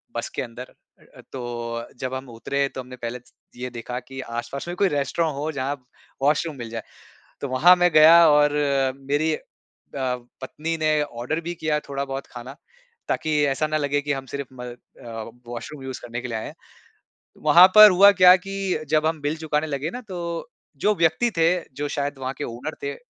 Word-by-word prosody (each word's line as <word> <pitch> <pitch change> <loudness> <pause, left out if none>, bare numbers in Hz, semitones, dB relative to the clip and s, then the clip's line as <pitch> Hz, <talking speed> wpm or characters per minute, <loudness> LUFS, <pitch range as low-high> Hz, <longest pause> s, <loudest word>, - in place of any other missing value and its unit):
बस 120 - -3
के - - -1
अंदर 125 0 -9 0.6
तो 120 -2 -5
जब 130 0 -4
हम 130 0 -5
उतरे 140 +4 -1
तो 130 - -4
हमने 125 0 -11
पहले 120 0 -5 0.4
ये 125 +1 -5
देखा 125 +1 -5
कि 135 +2 -11
आस-पास 120 +5 -6
में 175 - -4
कोई 200 - +3
रेस्टोरेंट 145 +2 -1
हो, 150 +3 -3
जहाँ 140 0 -2 0.5
वॉशरूम 150 +2 +1
मिल 115 -2 -7
जाए। 115 -1 -5 0.6
तो 140 - -3
वहाँ 155 +8 +6
मैं 175 0 +3
गया 165 +2 +8
और 150 0 +4 0.6
मेरी 155 +2 +2
अ, - - -4 0.6
पत्नी 130 +5 -4
ने 155 -1 +2
ऑर्डर 125 +4 -4
भी 170 +1 -4
किया 155 -1 -1
थोड़ा 140 0 -2
बहुत 135 0 -6
खाना 125 +3 -9 0.5
ताकि 155 - -1 0.2
ऐसा 140 +3 0
ना 155 0 0
लगे 145 -1 0
कि 145 0 -1
हम 135 -1 -5
सिर्फ 140 -2 -4
म 125 -1 -9
अ, 115 -2 -10 0.2
वॉशरूम 125 +4 -7
यूज 130 -1 -6
करने 120 0 -6
के 125 - -5
लिए 115 -2 -3
आए 110 - -5
हैं। - - -10 0.9
वहाँ 170 +5 +8
पर 215 0 +11
हुआ 200 +3 +8
क्या 180 0 +10
कि 195 -4 -3
जब 155 0 +2
हम 160 -2 -1
बिल 150 +2 -2
चुकाने 155 0 -1
लगे 145 +2 -3
ना 250 - -6
तो 180 -2 -5 0.7
जो 210 - +5
व्यक्ति 170 +8 +2
थे 165 0 +4 0.3
जो 145 +1 -3
शायद 145 -1 -3
वहाँ 130 +1 -3
के 145 - -4
ओनर 120 +7 -6
थे। 140 0 -3
140 Hz, 190 wpm, -23 LUFS, 125-155 Hz, 0.9 s, पर